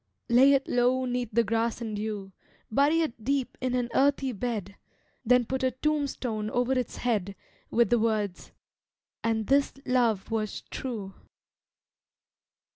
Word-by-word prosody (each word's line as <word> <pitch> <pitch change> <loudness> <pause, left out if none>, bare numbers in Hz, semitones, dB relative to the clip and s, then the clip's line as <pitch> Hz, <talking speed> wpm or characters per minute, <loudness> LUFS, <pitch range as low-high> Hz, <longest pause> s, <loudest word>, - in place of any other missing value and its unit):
Lay 260 +4 +6
it 275 0 +1
low 250 +1 +2
'neath 245 -2 -2
the 235 +2 +3
grass 230 +2 0
and 225 -3 -4
dew, 205 -2 -4 0.4
Bury 290 +7 +3
it 235 -8 -3
deep 265 0 -1
in 255 -1 0
an 245 -1 0
earthy 275 -1 +2
bed, 205 -3 -4 0.5
Then 250 0 +4
put 265 +3 -2
a 260 - +3
tombstone 255 -5 -2
over 245 +3 +1
its 255 -2 -2
head 205 -5 -1 0.3
With 235 +1 +2
the 240 - +4
words 215 -4 -1 0.7
"And 225 -1 0
this 275 +3 +2
love 235 -5 +1
was 215 -2 -2
true." 215 -7 -5
240 Hz, 140 wpm, -28 LUFS, 220-260 Hz, 0.7 s, Lay